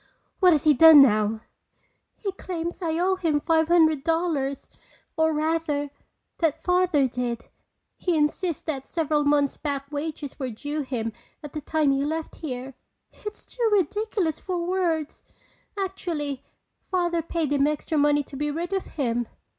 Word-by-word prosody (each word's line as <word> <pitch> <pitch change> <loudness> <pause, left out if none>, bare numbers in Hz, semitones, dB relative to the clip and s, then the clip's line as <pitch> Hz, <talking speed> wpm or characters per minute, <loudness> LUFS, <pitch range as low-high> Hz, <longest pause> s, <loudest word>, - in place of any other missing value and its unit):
"What 365 -2 +6
has 300 -4 +3
he 305 - +6
done 310 0 +9
now?" 215 -2 +2 0.7
"He 400 - -4
claims 350 -2 -5
I 325 -2 -1
owe 375 +2 +2
him 325 -5 +1
five 320 +1 +2
hundred 315 -4 +4
dollars. 325 -5 -1 0.5
Or 320 0 +3
rather, 305 -2 -1 0.5
that 325 -4 0
Father 360 -6 +3
did. 245 -1 -4 0.5
He 350 -3 0
insists 310 +3 0
that 275 -4 -4
several 305 -2 0
months 285 -1 +2
back 280 -1 -4
wages 295 -1 -5
were 260 -2 -2
due 290 +7 -4
him 235 -5 -3 0.3
at 295 - -8
the 305 - -4
time 305 -1 +1
he 275 0 +1
left 315 +2 -3
here. 265 -3 -5 0.4
It's 420 0 -9
too 475 -2 -1
ridiculous 405 -3 0
for 355 -2 -3
words! 345 -4 -1 0.6
Actually, 330 -8 -3 0.5
Father 345 -2 +1
paid 325 -2 -2
him 285 0 +3
extra 300 +1 -1
money 290 0 +3
to 275 - -12
be 295 +2 -1
rid 340 +5 -3
of 385 - -1
him." 240 -5 -2
310 Hz, 155 wpm, -25 LUFS, 285-340 Hz, 0.7 s, done